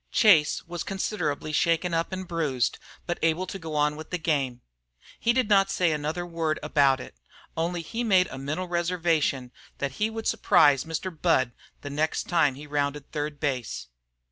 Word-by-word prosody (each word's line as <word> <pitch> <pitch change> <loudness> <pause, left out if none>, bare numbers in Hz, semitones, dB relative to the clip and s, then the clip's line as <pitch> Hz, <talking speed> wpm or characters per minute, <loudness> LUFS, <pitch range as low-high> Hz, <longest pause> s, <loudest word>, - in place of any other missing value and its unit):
Chase 170 -10 +5
was 175 0 -5
considerably 175 -7 -2
shaken 170 +3 +1
up 165 +2 0
and 185 -1 -5
bruised, 150 -8 -1 0.3
but 175 - -3
able 165 +3 +1
to 195 +1 -6
go 160 -3 -6
on 150 0 +2
with 155 0 -9
the 180 - -1
game. 140 -7 -1 0.6
He 235 - +3
did 250 -2 +1
not 195 -2 +4
say 175 -4 +2
another 155 +4 -2
word 165 -2 -1
about 140 -3 +3
it, - - -9 0.4
only 170 +1 -1
he 230 +8 -3
made 190 -5 +4
a 135 - -6
mental 155 +7 -3
reservation 170 -7 0 0.3
that 140 -1 -2
he 215 - +3
would 225 0 -6
surprise 140 -3 +4
Mr. 165 +2 -4
Budd 155 -6 +2 0.3
the 145 - -6
next 155 +2 0
time 160 -6 +3
he 145 +2 -9
rounded 145 -1 -2
third 150 -1 -3
base. 125 - -3
160 Hz, 175 wpm, -26 LUFS, 145-180 Hz, 0.6 s, Chase